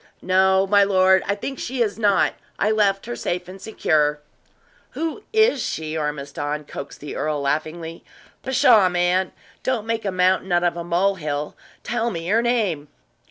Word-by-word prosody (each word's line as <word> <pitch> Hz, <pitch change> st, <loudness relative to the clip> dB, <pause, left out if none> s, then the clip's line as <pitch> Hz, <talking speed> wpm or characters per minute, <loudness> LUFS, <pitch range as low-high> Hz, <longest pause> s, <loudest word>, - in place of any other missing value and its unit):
"No, 190 Hz, +1 st, +3 dB
my 200 Hz, +1 st, +4 dB
lord, 190 Hz, -1 st, +4 dB
I 200 Hz, -, +1 dB
think 270 Hz, +6 st, -6 dB
she 250 Hz, -1 st, -1 dB
is 215 Hz, 0 st, -4 dB
not. 205 Hz, -3 st, +3 dB, 0.2 s
I 210 Hz, -, +1 dB
left 200 Hz, -2 st, +1 dB
her 240 Hz, +1 st, -5 dB
safe 180 Hz, 0 st, -3 dB
and 190 Hz, +1 st, -11 dB
secure." 150 Hz, -8 st, +1 dB, 0.8 s
"Who 330 Hz, +6 st, -3 dB
is 440 Hz, -, +3 dB
she, 155 Hz, -6 st, -3 dB
Ormiston?" 150 Hz, 0 st, -3 dB
coaxed 140 Hz, -, -9 dB
the 145 Hz, -, -7 dB
earl, 150 Hz, -1 st, -1 dB
laughingly. 160 Hz, +3 st, -3 dB, 0.4 s
"Pshaw, 225 Hz, -7 st, +4 dB
man! 180 Hz, +1 st, +1 dB, 0.3 s
don't 245 Hz, -5 st, -1 dB
make 230 Hz, 0 st, -2 dB
a 195 Hz, -, -1 dB
mountain 185 Hz, 0 st, +1 dB
out 175 Hz, 0 st, +3 dB
of 175 Hz, -1 st, +1 dB
a 170 Hz, -, -4 dB
mole 185 Hz, +3 st, +1 dB
hill! 150 Hz, 0 st, -3 dB, 0.3 s
Tell 235 Hz, +1 st, -1 dB
me 165 Hz, -5 st, -5 dB
her 225 Hz, +3 st, +3 dB
name!" 210 Hz, -11 st, 0 dB
185 Hz, 165 wpm, -22 LUFS, 160-215 Hz, 0.8 s, my